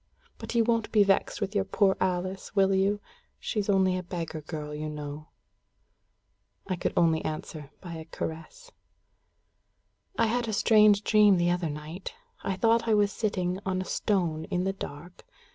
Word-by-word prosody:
But -, -, -6 dB
you 230 Hz, -, +5 dB
won't 230 Hz, -1 st, 0 dB
be 210 Hz, -2 st, +5 dB
vexed 195 Hz, +2 st, +1 dB
with 200 Hz, 0 st, -2 dB
your 200 Hz, -2 st, +2 dB
poor 195 Hz, 0 st, +2 dB
Alice, 185 Hz, +2 st, -2 dB
will 195 Hz, -1 st, +4 dB
you? 195 Hz, +2 st, +2 dB, 0.4 s
She's 210 Hz, -3 st, -3 dB
only 190 Hz, -2 st, +3 dB
a 185 Hz, -, -2 dB
beggar 170 Hz, -3 st, -5 dB
girl, 150 Hz, -1 st, -6 dB
you 155 Hz, +1 st, -4 dB
know." 150 Hz, 0 st, -7 dB, 1.4 s
I 185 Hz, -, -2 dB
could 175 Hz, -, -3 dB
answer 160 Hz, -1 st, 0 dB
only 145 Hz, -1 st, -12 dB
by 175 Hz, -3 st, -8 dB
a 160 Hz, -, -8 dB
caress. 165 Hz, -, -7 dB, 1.5 s
"I -, -, +4 dB
had 235 Hz, +1 st, 0 dB
a 220 Hz, -, -2 dB
strange 210 Hz, -1 st, +5 dB
dream 210 Hz, -3 st, +5 dB
the 175 Hz, 0 st, +2 dB
other 175 Hz, -2 st, -1 dB
night. 155 Hz, -, -7 dB, 0.3 s
I 195 Hz, -, -1 dB
thought 230 Hz, +3 st, +2 dB
I 220 Hz, -, +4 dB
was 205 Hz, -1 st, +3 dB
sitting 185 Hz, -4 st, -1 dB
on 185 Hz, -1 st, -1 dB
a 185 Hz, -, -3 dB
stone 170 Hz, -8 st, -1 dB
in 180 Hz, +2 st, -1 dB
the 195 Hz, +1 st, 0 dB
dark. 175 Hz, -1 st, -9 dB
190 Hz, 170 wpm, -28 LUFS, 165-205 Hz, 1.5 s, you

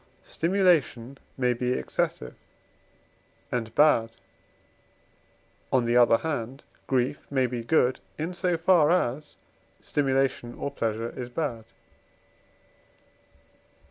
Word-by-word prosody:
Stimulation 165 Hz, -8 st, +1 dB, 0.2 s
may 125 Hz, -2 st, +2 dB
be 125 Hz, +1 st, -1 dB
excessive 65 Hz, -, -2 dB, 1.2 s
and 115 Hz, -2 st, -3 dB
bad; 145 Hz, -7 st, +4 dB, 1.6 s
on 125 Hz, -2 st, +2 dB
the 120 Hz, +1 st, +1 dB
other 120 Hz, -2 st, +6 dB
hand, 135 Hz, -3 st, -4 dB, 0.2 s
grief 130 Hz, +2 st, -1 dB
may 130 Hz, -2 st, +1 dB
be 120 Hz, -1 st, -4 dB
good, 125 Hz, 0 st, +2 dB, 0.2 s
in 165 Hz, +4 st, -3 dB
so 175 Hz, -1 st, 0 dB
far 165 Hz, -2 st, +4 dB
as 150 Hz, -5 st, 0 dB, 0.4 s
stimulation 135 Hz, -4 st, -1 dB
or 140 Hz, -, -4 dB
pleasure 115 Hz, -3 st, -3 dB
is 125 Hz, -1 st, -7 dB
bad. 120 Hz, -5 st, -3 dB
130 Hz, 100 wpm, -26 LUFS, 120-150 Hz, 1.6 s, other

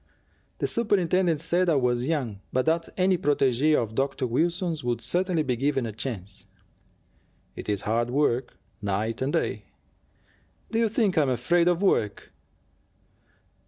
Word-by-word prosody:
"The -, -, -1 dB
superintendent 185 Hz, -7 st, +1 dB
said 180 Hz, +1 st, +1 dB
I 160 Hz, -, +3 dB
was 125 Hz, -1 st, +1 dB
young, 130 Hz, -11 st, -2 dB
but 130 Hz, -, +1 dB
that 165 Hz, +1 st, +1 dB
any 185 Hz, -1 st, +2 dB
protegee 145 Hz, 0 st, +2 dB
of 110 Hz, -5 st, -1 dB
Dr. 135 Hz, +2 st, -1 dB
Wilson's 165 Hz, -, -1 dB
would 120 Hz, -1 st, -1 dB
certainly 180 Hz, -3 st, 0 dB
be 130 Hz, -3 st, 0 dB
given 135 Hz, 0 st, 0 dB
a 115 Hz, -, -4 dB
chance." 100 Hz, -4 st, -6 dB, 1.1 s
"It -, -, -7 dB
is 100 Hz, -2 st, -1 dB
hard 115 Hz, +3 st, 0 dB
work, 125 Hz, -2 st, 0 dB, 0.2 s
night 105 Hz, +4 st, -2 dB
and 135 Hz, +2 st, 0 dB
day." -, -, -1 dB, 1.1 s
"Do 225 Hz, -, +1 dB
you 230 Hz, -1 st, +2 dB
think 205 Hz, -6 st, +1 dB
I -, -, +5 dB
am 140 Hz, -, +1 dB
afraid 170 Hz, +8 st, +2 dB
of 175 Hz, +2 st, +2 dB
work?" 105 Hz, -, 0 dB
140 Hz, 150 wpm, -26 LUFS, 120-175 Hz, 1.1 s, I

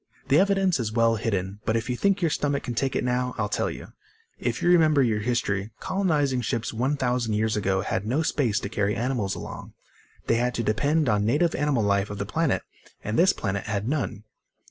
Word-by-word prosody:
"The 140 Hz, -, +5 dB
evidence 195 Hz, -4 st, +2 dB
is 110 Hz, -3 st, -2 dB
well 115 Hz, 0 st, +3 dB
hidden. 100 Hz, -3 st, -2 dB
But 110 Hz, -, 0 dB
if 115 Hz, -, -3 dB
you 125 Hz, -, -1 dB
think 195 Hz, +6 st, +1 dB
your 165 Hz, -, +2 dB
stomach 145 Hz, -1 st, -1 dB
can 120 Hz, -, -4 dB
take 135 Hz, +3 st, -1 dB
it -, -, 0 dB
now, 125 Hz, 0 st, -1 dB
I'll 105 Hz, -2 st, 0 dB
tell -, -, 0 dB
you. -, -, -9 dB, 0.5 s
If 120 Hz, 0 st, -2 dB
you -, -, +2 dB
remember 155 Hz, -5 st, +5 dB
your 110 Hz, -3 st, +1 dB
history, 105 Hz, -3 st, -1 dB
colonizing 155 Hz, -9 st, 0 dB
ships 115 Hz, 0 st, -2 dB
1000 125 Hz, -2 st, 0 dB
years 110 Hz, +1 st, +1 dB
ago 95 Hz, -2 st, 0 dB
had 95 Hz, -, -2 dB
no 140 Hz, +8 st, +1 dB
space 125 Hz, -8 st, +1 dB
to -, -, -3 dB
carry 105 Hz, -1 st, 0 dB
animals 115 Hz, -5 st, -1 dB
along. -, -, -8 dB, 0.5 s
They 115 Hz, -, +2 dB
had 125 Hz, +1 st, 0 dB
to 115 Hz, -, -1 dB
depend 140 Hz, +8 st, +1 dB
on 105 Hz, -2 st, +2 dB
native 150 Hz, +10 st, +2 dB
animal 140 Hz, -5 st, +1 dB
life 100 Hz, 0 st, +1 dB
of 105 Hz, -, -5 dB
the -, -, -3 dB
planet, -, -, 0 dB, 0.4 s
and 105 Hz, -, -2 dB
this 185 Hz, +7 st, +5 dB
planet 100 Hz, -1 st, -3 dB
had 105 Hz, 0 st, -2 dB
none." 120 Hz, -7 st, -2 dB
120 Hz, 210 wpm, -25 LUFS, 105-145 Hz, 0.5 s, The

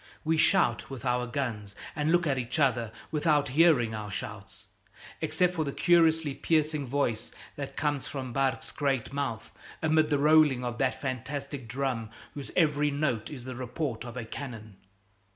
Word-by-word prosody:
We 160 Hz, 0 st, +2 dB
shout 120 Hz, -6 st, +3 dB
with 135 Hz, -2 st, -7 dB
our 125 Hz, 0 st, +1 dB
guns, 115 Hz, -6 st, -3 dB, 0.2 s
and 150 Hz, +1 st, +1 dB
look 175 Hz, 0 st, +3 dB
at 135 Hz, -4 st, +1 dB
each 125 Hz, +4 st, -3 dB
other 120 Hz, -6 st, +2 dB, 0.2 s
without 150 Hz, -2 st, +2 dB
hearing 140 Hz, -6 st, +4 dB
our 105 Hz, -1 st, -5 dB
shouts 105 Hz, -1 st, -7 dB, 0.6 s
except 180 Hz, -1 st, +2 dB
for 160 Hz, -3 st, 0 dB
the 140 Hz, -, -3 dB
curiously 160 Hz, -3 st, +3 dB
piercing 155 Hz, -1 st, +1 dB
voice 120 Hz, -4 st, -1 dB, 0.2 s
that 140 Hz, -1 st, -6 dB
comes 145 Hz, -3 st, 0 dB
from 130 Hz, -3 st, -5 dB
Barque's 135 Hz, 0 st, 0 dB
great 135 Hz, -3 st, -1 dB
mouth 140 Hz, -6 st, -3 dB, 0.3 s
amid 155 Hz, -1 st, +3 dB
the 145 Hz, -, +3 dB
rolling 150 Hz, -3 st, +5 dB
of 120 Hz, -1 st, -4 dB
that 130 Hz, -2 st, +1 dB
fantastic 140 Hz, 0 st, -4 dB
drum 125 Hz, -2 st, -2 dB, 0.2 s
whose 140 Hz, -2 st, -7 dB
every 150 Hz, -3 st, +3 dB
note 140 Hz, -6 st, -1 dB
is 135 Hz, -5 st, -8 dB
the 130 Hz, -, -5 dB
report 125 Hz, -1 st, -3 dB
of 120 Hz, 0 st, -8 dB
a 120 Hz, -, -4 dB
cannon. 110 Hz, -5 st, -8 dB
135 Hz, 165 wpm, -29 LUFS, 120-150 Hz, 0.6 s, rolling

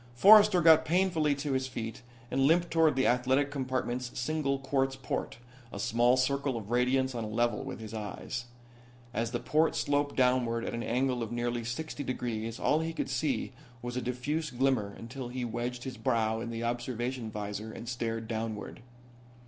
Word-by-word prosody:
Forrester 205 Hz, -, +8 dB
got 160 Hz, -1 st, +7 dB
painfully 165 Hz, -4 st, +2 dB
to 140 Hz, +1 st, -3 dB
his 130 Hz, 0 st, 0 dB
feet 115 Hz, -1 st, -5 dB, 0.3 s
and 135 Hz, -, +1 dB
limped 170 Hz, +2 st, +3 dB
toward 160 Hz, -3 st, +4 dB
the 130 Hz, -, +2 dB
athletic 130 Hz, +3 st, +2 dB
compartment's 130 Hz, -2 st, -2 dB
single 140 Hz, +1 st, 0 dB
quartz 135 Hz, 0 st, 0 dB
port 135 Hz, -2 st, -4 dB, 0.3 s
a -, -, -7 dB
small 120 Hz, +4 st, +3 dB
circle 140 Hz, 0 st, +1 dB
of 110 Hz, 0 st, -7 dB
radiance 130 Hz, +2 st, +2 dB
on 115 Hz, -2 st, -3 dB
a -, -, -4 dB
level 120 Hz, 0 st, 0 dB
with -, -, -6 dB
his 110 Hz, -1 st, -8 dB
eyes. 110 Hz, +3 st, -5 dB, 0.7 s
As 115 Hz, -1 st, -1 dB
the 120 Hz, 0 st, -2 dB
port 155 Hz, +2 st, +2 dB
sloped 145 Hz, 0 st, 0 dB
downward 125 Hz, -2 st, +2 dB
at -, -, -3 dB
an 115 Hz, -, -3 dB
angle 125 Hz, +2 st, 0 dB
of 115 Hz, -1 st, -4 dB
nearly 120 Hz, 0 st, -1 dB
sixty 145 Hz, +6 st, -4 dB
degrees 115 Hz, -3 st, -3 dB
all 155 Hz, -, +2 dB
he 165 Hz, +1 st, -2 dB
could 150 Hz, -, -3 dB
see 135 Hz, 0 st, -1 dB, 0.3 s
was 120 Hz, 0 st, -4 dB
a 125 Hz, -, -1 dB
diffuse 145 Hz, +6 st, -2 dB
glimmer 125 Hz, -5 st, +1 dB
until 125 Hz, +2 st, -7 dB
he 125 Hz, 0 st, -4 dB
wedged 120 Hz, +1 st, -3 dB
his 130 Hz, -3 st, -6 dB
brow 110 Hz, -1 st, +1 dB
in 115 Hz, -, -4 dB
the 115 Hz, 0 st, -4 dB
observation 120 Hz, 0 st, -2 dB
visor 105 Hz, 0 st, -5 dB
and 115 Hz, -, -8 dB
stared 115 Hz, -2 st, -3 dB
downward. 110 Hz, 0 st, -4 dB
125 Hz, 180 wpm, -30 LUFS, 115-135 Hz, 0.7 s, Forrester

